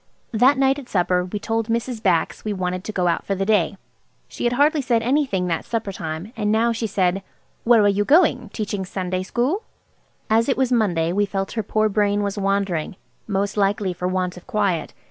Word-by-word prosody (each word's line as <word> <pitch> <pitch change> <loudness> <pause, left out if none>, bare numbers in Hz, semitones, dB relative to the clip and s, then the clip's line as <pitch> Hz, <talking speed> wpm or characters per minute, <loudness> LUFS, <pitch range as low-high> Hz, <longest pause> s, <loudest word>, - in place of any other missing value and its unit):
That 255 +5 +4
night 270 +1 +2
at 260 - -12
supper 180 -1 +1
we 185 +3 -4
told 225 +1 -2
Mrs. 235 0 -2
Bax 175 -6 +1
we 215 - -2
wanted 185 -1 -3
to - - -3
go 180 -4 0
out 170 - 0
for 195 - -2
the 195 +1 -1
day. 200 -3 +2 0.5
She - - -5
had 240 - +2
hardly 290 +3 +3
said 235 -3 +1
anything 250 -8 +1
that 165 -2 -1
supper 225 -4 -3
time, 165 +4 -6
and 210 -2 0
now 230 +2 +3
she 225 0 -2
said– 190 -1 0 0.4
"Where 230 -2 +6
are - - +5
you 205 0 +2
going? 315 - +3
Teaching 205 -3 -3
Sunday 185 -1 -3
school?" 250 - -1 0.7
As 225 +3 +2
it 270 - +1
was 260 -1 +1
Monday, 175 -8 +1
we 205 +1 +1
felt 195 -1 -3
her 225 - -1
poor 215 +1 +1
brain 205 0 +1
was 200 0 -2
wandering–most 195 +1 -2
likely 200 -1 +1
for 180 +1 -3
want 185 -1 -2
of 180 - -13
quiet. 205 -8 -1
205 Hz, 205 wpm, -22 LUFS, 185-230 Hz, 0.7 s, Where